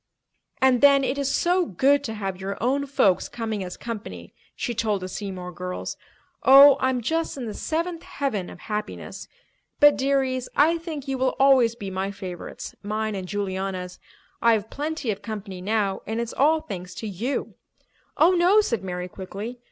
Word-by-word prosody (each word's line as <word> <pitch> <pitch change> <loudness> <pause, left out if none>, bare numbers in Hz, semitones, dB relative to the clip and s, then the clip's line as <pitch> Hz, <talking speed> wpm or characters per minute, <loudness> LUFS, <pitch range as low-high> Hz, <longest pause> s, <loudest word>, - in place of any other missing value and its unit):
"And 260 -2 +4
then 280 -1 +6
it 270 +2 -1
is 280 -1 0
so 360 +4 +2
good 280 - +2
to 225 - -4
have 195 -3 -4
your 195 +1 -4
own 275 +4 0
folks 260 -10 +2
coming 220 -4 -3
as 180 -1 -7
company," 230 -1 -7 0.2
she 240 - -3
told 215 -4 -1
the - - -3
Seymour 185 -2 -6
girls. 180 +1 -5 0.5
"Oh, 275 +1 +9
I'm 260 -1 +1
just 325 +5 -1
in 255 - -4
the 215 - -5
seventh 335 +5 -2
heaven 220 -10 -3
of - - -12
happiness. 210 -1 -5 0.5
But, 290 0 +7
dearies, 265 -2 0
I 330 +3 +4
think 315 -4 -6
you 270 -1 -2
will 260 0 +1
always 260 -4 +5
be 200 -4 -6
my 190 +1 -2
favourites—mine 205 +3 -5
and 190 -2 -5
Juliana's. 190 -2 -3 0.4
I've 220 -2 +2
plenty 295 -4 -2
of 205 0 -5
company 205 -3 -6
now 200 -1 0
and 220 +2 -2
it's 235 -1 -3
all 310 +3 +3
thanks 180 -5 -7
to 220 - -5
you." 220 +8 -3 0.6
"Oh, 335 +3 +6
no," 365 +3 +5
said 235 - 0
Mary 180 -1 -4
quickly. 200 +6 -7
230 Hz, 170 wpm, -24 LUFS, 195-275 Hz, 0.6 s, Oh